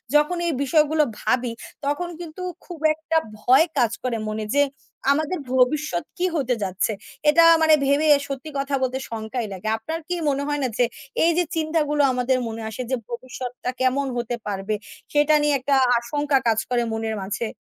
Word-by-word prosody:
যখন 300 +4 +3
এই 330 - +1
বিষয়গুলো 305 +2 +3 0.2
ভাবি, 245 +1 +1 0.3
তখন 320 +5 -1
কিন্তু 340 0 -8 0.2
খুব 350 -3 -9 0.2
একটা 320 +1 -1 0.2
ভয় 265 +9 +5
কাজ 240 -4 +3
করে 245 -3 -1
মনে 215 0 -3
যে, 285 - +6 0.5
আমাদের 310 +4 -1
ভবিষ্যৎ 255 - +2
কী 360 - +1
হতে 260 -5 +1
যাচ্ছে। 190 +3 0 0.4
এটা 330 +3 +6 0.2
মানে 315 -1 +6
ভেবে 285 +3 +3 0.2
সত্যি 275 +2 -5
কথা 275 0 -1
বলতে 260 0 0
শঙ্কাই 225 +1 -4
লাগে। 190 +3 -7
আপনার 320 +9 -4
কি 355 - -1
মনে 280 0 0
হয় 290 0 -1
না - - +2
যে, 245 - +4 0.4
এই 335 - +5
যে 355 - +4
চিন্তাগুলো 310 -2 +1
আমাদের 250 +1 +1
মনে 225 0 -5
আসে, 220 +3 -6
যে - - +3
ভবিষ্যৎটা 250 +1 -5
কেমন 265 +2 +2
হতে 240 0 -2
পারবে 200 +1 -2 0.4
সেটা 295 +1 +4
নিয়ে 295 0 +2
একটা 275 +2 +1 0.2
আশঙ্কা 290 +3 0
কাজ 225 -1 +3
করে 245 -1 +1
মনের 220 0 -2
মাঝে? 205 +4 -3
270 Hz, 175 wpm, -23 LUFS, 235-305 Hz, 0.5 s, যে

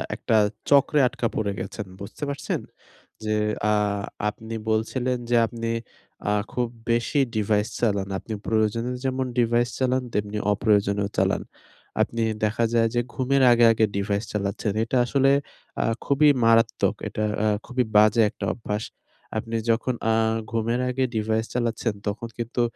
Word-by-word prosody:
একটা 115 - 0 0.3
চক্রে 145 +1 +5
আটকা 120 - -2
পড়ে 100 -2 0
গেছেন। 100 +2 -5
বুঝতে 100 +8 -8
পারছেন? 140 - -2 0.6
যে 110 0 0 0.4
আ - - +4 0.6
আপনি 110 +2 -9 0.2
বলছিলেন 125 +3 0
যে 120 - +3
আপনি 115 0 -4 0.6
আ - - +2 0.2
খুব 125 -1 0 0.2
বেশি 120 +5 +1 0.2
ডিভাইস 105 0 +1
চালান। 100 -4 +1
আপনি 110 - -6
প্রয়োজনে 110 +2 0
যেমন 130 0 0
ডিভাইস 120 +1 +2
চালান, 130 0 +1
তেমনি 105 0 -2
অপ্রয়োজনেও 100 -1 +2
চালান। - - +2 0.6
আপনি 115 - 0 0.2
দেখা 110 +2 +1
যায় 115 -1 +4
যে - - +3
ঘুমের 135 +1 +1
আগে, 120 0 +6
আগে 110 -1 +3
ডিভাইস 100 +1 -1
চালাচ্ছেন। 100 +1 -1
এটা 115 +3 0
আসলে 135 +2 +3 0.5
আ - - +2 0.2
খুবই 145 +2 +4 0.2
মারাত্মক। 115 0 +3
এটা 110 - -3 0.2
আ - - +3 0.2
খুবই 125 0 0
বাজে 105 +2 +6
একটা - - -6
অভ্যাস। 105 -2 -3 0.5
আপনি 115 +1 -3 0.2
যখন 120 +3 0 0.2
আ - - +3 0.4
ঘুমের 115 +1 0
আগে 130 +1 0
ডিভাইস 110 +1 0
চালাচ্ছেন, 115 -2 -1
তখন 110 +3 -3
কিন্তু 120 +1 -2
115 Hz, 145 wpm, -24 LUFS, 105-125 Hz, 0.6 s, আগে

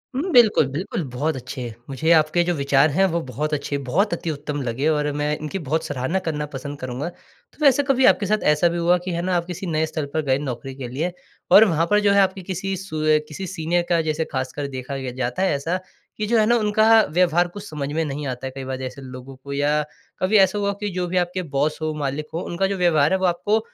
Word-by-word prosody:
हुँ, 340 +7 -1
बिल्कुल, 220 - +6
बिल्कुल, 160 +4 -3
बहुत 145 +5 -1
अच्छे। 125 -2 -6 0.2
मुझे 155 +5 0
आपके 160 +1 +4
जो 175 0 0
विचार 140 +1 +3
है 190 +7 +3
वो 170 -1 -1
बहुत 150 +4 -3
अच्छे, 145 0 -2
बहुत 200 - +2
अति 165 -1 -2
उत्तम 145 0 -4
लगे 130 +4 -1
और 150 -1 +1
मैं 150 +1 0
इनकी 155 +5 -5
बहुत 160 +3 0
सराहना 145 +6 -1
करना 150 -2 -2
पसंद 140 +1 -6
करूँगा। 130 +6 -4
तो - - -24
वैसे 280 +1 +5
कभी 265 -1 +3
आपके 205 - +4
साथ 215 +2 0
ऐसा 150 +3 +3
भी 170 - -3
हुआ 175 +1 +3
कि 185 - -2
है 170 0 -2
ना 185 0 0
आप 170 -1 0
किसी 180 +1 -6
नए 160 -1 +1
स्थल 155 -2 -4
पर 160 - +1
गए 130 -1 +2
नौकरी 135 -1 -5
के 130 -2 -6
लिए 155 +9 -2 0.4
और 220 +2 +9
वहाँ 165 -3 +1
पर 210 - +5
जो 205 -1 +3
है 200 - +5
आपकी 190 0 0
किसी 190 +1 -3
सु 165 -5 -5 0.3
किसी 185 +5 -6
सीनियर 175 0 -1
का 170 -2 +3
जैसे 160 +1 -1
ख़ासकर 135 +1 -3
देखा 130 +2 -5
जाता 125 +5 -3
है 190 - +2
ऐसा 165 +6 -2 0.4
कि 215 - -1
जो 230 +1 +3
है 215 - +4
ना 235 - +4
उनका 220 +1 +5
व्यवहार 175 0 +3
कुछ 205 +3 -10
समझ 145 -2 -4
में 165 - 0
नहीं 145 0 -4
आता 130 0 -5
है 130 - -6
कई 135 - -5
बार 130 0 -4
जैसे 130 +1 -7
लोगो 130 +1 -10
को 140 - -6
या 145 +2 +1 0.4
कभी 195 +4 +3
ऐसा 195 +1 +4
हुआ 200 0 0
की 210 - -2
जो 180 -1 -2
भी 185 - -1
आपके 180 +1 0
बॉस 150 +3 +1
हो, 155 0 -1
मालिक 145 0 -3
हो 165 - -2
उनका 185 +3 -1
जो 195 0 -2
व्यवहार 160 -4 +3
है - - +3
वो 190 - +1
आपको 205 +5 +1
160 Hz, 245 wpm, -22 LUFS, 140-185 Hz, 0.4 s, और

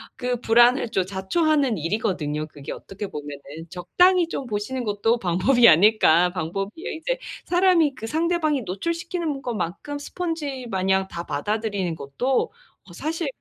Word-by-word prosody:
그 250 -2 -2
불안을 240 +2 +4
또 190 - +1
자초하는 255 - +1
일이거든요, 155 -4 -1
그게 145 -2 -9
어떻게 200 +1 -7
보면은. 145 -4 -7 0.3
적당히 345 - +3
좀 275 - -4
보시는 240 +3 -3
것도 220 +2 +1
방법이 230 +7 +4
아닐까 180 -1 +5
방법이에요. 195 - -4
이제 - - -2 0.3
사람이 350 -5 +3
그 225 - -7
상대방이 315 -1 +1
노출시키는 330 - -3
것만큼 235 - -4
스펀지마냥 260 - -2
다 170 -2 -6
받아들이는 200 +1 -2
것도 140 - -5 0.6
다 - - -14
사실 325 +1 -3
225 Hz, 340 characters per minute, -24 LUFS, 185-300 Hz, 0.6 s, 아닐까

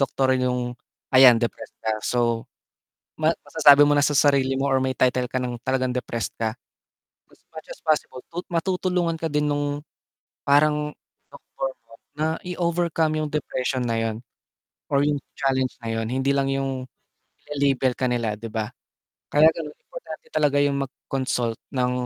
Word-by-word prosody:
doktor 135 -1 +2
yung 125 -1 -1 0.4
ayan 130 -3 +9
depressed 120 0 -4
ka. 110 0 -1
So, 115 -2 0 0.7
ma 155 +1 +2 0.2
masasabi 145 -2 +7
mo 145 - +3
na 145 - +3
sa 145 - +3
sarili 140 -2 +3
mo 140 - +1
or 135 -1 +2
may 130 - 0
title 125 -1 +2
ka 130 - 0
ng 125 -1 -3
talagang 130 -1 0
depressed 115 -5 -3
ka. 110 -1 0 0.8
As - - -25
much 160 -1 -10
as - - -10
possible, 155 -5 0
tu 175 - -3
matutulungan 175 -1 0
ka 165 - -1
din 150 0 0
nung 145 0 -2 0.6
parang 150 +1 +3 0.4
doktor 135 - -5 0.2
mo 115 - -19 0.2
na 155 - 0 0.2
i-overcome 170 -3 0
yung 150 - -2
depression 130 -3 -2
na 115 - 0
yun, 110 -1 -2 0.7
or 140 0 +2
yung 145 0 +1 0.2
challenge 130 -1 0
na 115 - -4
yun, 115 0 -1
hindi 130 +3 0
lang 140 -1 +2
yung 135 -1 -2 0.6
ile-label 140 -3 +1
ka 130 0 -1
nila, 115 -3 0
'di 115 +2 -8
ba? 110 -1 -2 0.6
Kaya 150 +1 +4
ganun, 150 -2 -7
importante - - -10
talaga 145 -1 +2
yung 140 -1 0
mag-consult 125 -4 -3 0.2
ng 125 0 +1
135 Hz, 160 wpm, -24 LUFS, 125-150 Hz, 0.8 s, ayan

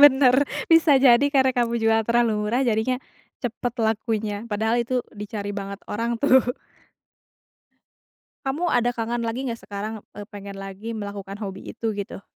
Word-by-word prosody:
Bener, 265 -3 +7 0.4
bisa 325 -3 +6
jadi 250 -1 +6
karena 265 -2 +4
kamu 235 -1 +1
jual 225 0 +4
terlalu 235 -3 +2
murah 245 +5 +1
jadinya 240 +1 +1 0.4
cepet 245 0 -3
lakunya 220 -1 -1
padahal 220 +1 0
itu 250 +2 0 0.2
dicari 205 0 -5
banget 200 0 -5
orang 230 +2 -2
tuh. 260 0 +5 2.0
Kamu 305 +6 0
ada 245 0 +3
kangen 235 +1 -1
lagi 235 +3 -2
nggak 235 -3 -3
sekarang, 205 +2 -4 0.2
eee, 205 - -6
pengen 200 -1 -8
lagi 195 +4 -6
melakukan 200 -1 -6
hobi 195 -2 -6 0.2
itu 225 -1 -1
gitu? 200 -2 -6
225 Hz, 145 wpm, -24 LUFS, 205-245 Hz, 2.0 s, Bener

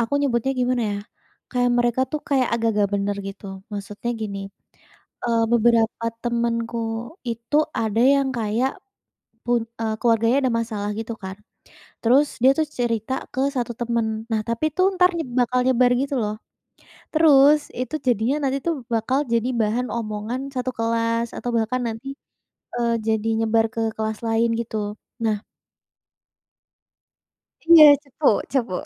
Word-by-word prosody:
aku 230 +2 -2
nyebutnya 265 -2 +1
gimana 250 -1 +1
ya, 200 - -3 0.5
kayak 245 -1 +1
mereka 240 +1 +1
tuh 305 - -2
kayak 265 -3 +2
agak 230 -1 0
nggak 205 -1 +1
bener 200 0 -1
gitu, 195 +1 -10 0.3
maksudnya 205 +3 -5
gini, 200 -2 -4 0.9
eee, 230 -1 +2
beberapa 230 -1 +3 0.2
temenku 235 -1 -1 0.5
itu 230 +4 -2 0.2
ada 220 0 0
yang 275 -1 +1
kayak 225 +4 0 0.8
pun 240 -1 +2 0.2
eee, 220 -1 -1
keluarganya 230 +1 +3
ada 255 - +2
masalah 215 -3 -3
gitu 225 +1 -4
kan, 190 0 -5 0.7
terus 270 +5 +3
dia 260 +2 +6
tuh 315 - +2
cerita 235 -2 -2 0.2
kesatu 260 -3 -1
temen, 235 -1 0 0.3
nah 220 -1 +1
tapi 235 +7 -1
itu 370 - 0
entar 360 -1 +4
nyeb 320 -6 -4
bakal 250 +1 +2
nyebar 250 -1 +4
gitu 280 0 -2
loh. 210 0 -2 0.8
Terus 300 -2 +5
itu 255 +3 -4
jadinya 245 +3 +2
nanti 270 +1 -1
tuh 335 - +2 0.2
bakal 230 +4 +1
jadi 235 +1 +1
bahan 225 +4 0
omongan 220 +1 -3
satu 255 0 -2
kelas 230 0 0
atau 245 - -3
bahkan 230 +3 0
nanti, 225 +3 -7 0.7
eee, 235 -1 +1
jadi 220 0 0
nyebar 225 0 +2
ke 230 - -2 0.2
kelas 220 -1 -3
lain 225 +1 +2
gitu. 215 -2 -4 0.3
Nah 215 -1 0 2.2
Iya 330 -1 +9 0.2
cepu 285 +1 -2 0.2
cepu. 240 -8 0
235 Hz, 140 wpm, -23 LUFS, 225-255 Hz, 2.2 s, Iya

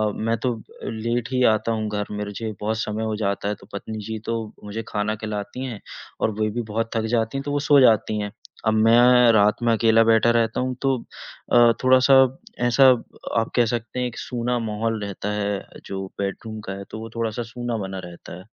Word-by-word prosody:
मैं 115 +1 -1
तो 125 - +1
अब 110 - -10 0.2
लेट 115 +1 -2
ही 125 -1 +2
आता 110 +1 -1
हूँ 110 -1 -1
घर। 105 -1 -2
मुझे 105 +2 -4
बहुत 110 +1 -1
समय 110 0 -2
हो 110 -1 -1
जाता 100 -1 -2
है, 105 - -1
तो - - -18
पत्नी 110 +2 -5
जी 110 0 -3
तो 115 0 -1 0.3
मुझे 105 +2 -5
खाना 105 0 -1
खिलाती 105 +3 -5
हैं 120 -5 -6 0.4
और 110 - +2
वे 110 0 +1
भी 120 +3 -2
बहुत 115 +1 -1
थक 110 -1 0
जाती 115 +3 0
हैं, 135 - -3
तो 145 - -4
वो 145 - +1
सो 145 -1 +7
जाती 110 -2 +4
हैं। 105 -1 -3 0.4
अब 110 - +4
मैं 120 +2 +6
रात 105 +2 +3
में 120 - +3
अकेला 115 0 +4
बैठा 115 +1 +4
रहता 115 -1 +1
हूँ, 130 0 -1
तो 135 -1 +2 0.6
अ, 120 -1 +7
थोड़ा-सा, 130 +1 +6 0.4
ऐसा 135 +3 +5 0.5
आप 115 - -2
कह 120 - +4
सकते 120 +2 -3
हैं, 125 - 0
एक 120 - -9
सूना 120 0 -2
माहौल 110 0 -2
रहता 100 +1 -4
है, 100 -1 -1 0.3
जो 95 0 -5
बेडरूम 110 +2 -4
का 95 - -3
है, 100 +1 -7
तो 110 - -6
वो 115 - -7
थोड़ा-सा 115 +1 -2
सूना 120 -1 -3
बना 95 0 -6
रहता 85 0 -10
है। 90 - -12
110 Hz, 215 wpm, -23 LUFS, 105-120 Hz, 0.6 s, सो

